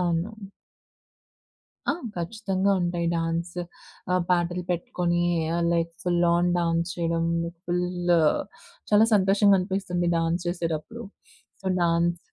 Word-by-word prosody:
అవును. 175 Hz, +3 st, 0 dB, 1.6 s
ఆ! 285 Hz, -, +4 dB, 0.2 s
ఖచ్చితంగా 195 Hz, +2 st, 0 dB
ఉంటాయి. 175 Hz, -1 st, -1 dB
డాన్స్ 165 Hz, +1 st, -2 dB, 0.6 s
ఆహ్, 180 Hz, -, +2 dB
పాటలు 175 Hz, 0 st, +1 dB
పెట్టుకొనీ 175 Hz, 0 st, 0 dB, 0.5 s
like 170 Hz, 0 st, 0 dB
full 175 Hz, -1 st, +2 dB
on 175 Hz, +1 st, +2 dB
dance 170 Hz, 0 st, 0 dB
చేయడమూ. 170 Hz, 0 st, 0 dB, 0.2 s
Full 180 Hz, 0 st, -1 dB, 0.8 s
చాలా 215 Hz, +2 st, +6 dB
సంతోషంగనిపిస్తుంది 195 Hz, -2 st, +2 dB
డాన్స్ 165 Hz, +2 st, 0 dB
చేసేటప్పుడు. 175 Hz, +6 st, -3 dB, 0.6 s
So -, -, -8 dB, 0.2 s
dance 170 Hz, 0 st, +2 dB
175 Hz, 95 wpm, -26 LUFS, 170-185 Hz, 1.6 s, చాలా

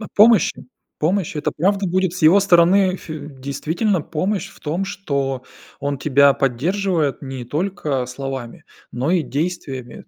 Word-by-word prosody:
О 210 Hz, -, -6 dB
помощи? 220 Hz, +2 st, +4 dB, 0.3 s
Помощь, 175 Hz, +2 st, 0 dB
это 150 Hz, -, -1 dB
правда 195 Hz, +4 st, +1 dB
будет 185 Hz, 0 st, 0 dB
с 180 Hz, -, -6 dB
его 175 Hz, +6 st, +7 dB
стороны 185 Hz, 0 st, +4 dB
ф -, -, -10 dB, 0.4 s
действительно 160 Hz, -, -1 dB
помощь 190 Hz, +6 st, -2 dB
в -, -, -18 dB
том, 165 Hz, +6 st, -2 dB
что 140 Hz, -10 st, -3 dB, 0.4 s
он 140 Hz, -1 st, -2 dB
тебя 140 Hz, -1 st, +5 dB
поддерживает 155 Hz, +4 st, 0 dB
не 135 Hz, -3 st, -6 dB
только 150 Hz, -4 st, -2 dB
словами, 130 Hz, -2 st, -6 dB, 0.3 s
но 130 Hz, +7 st, -1 dB
и 180 Hz, -3 st, +2 dB
действиями. 135 Hz, -2 st, -4 dB
160 Hz, 145 wpm, -20 LUFS, 135-190 Hz, 0.4 s, его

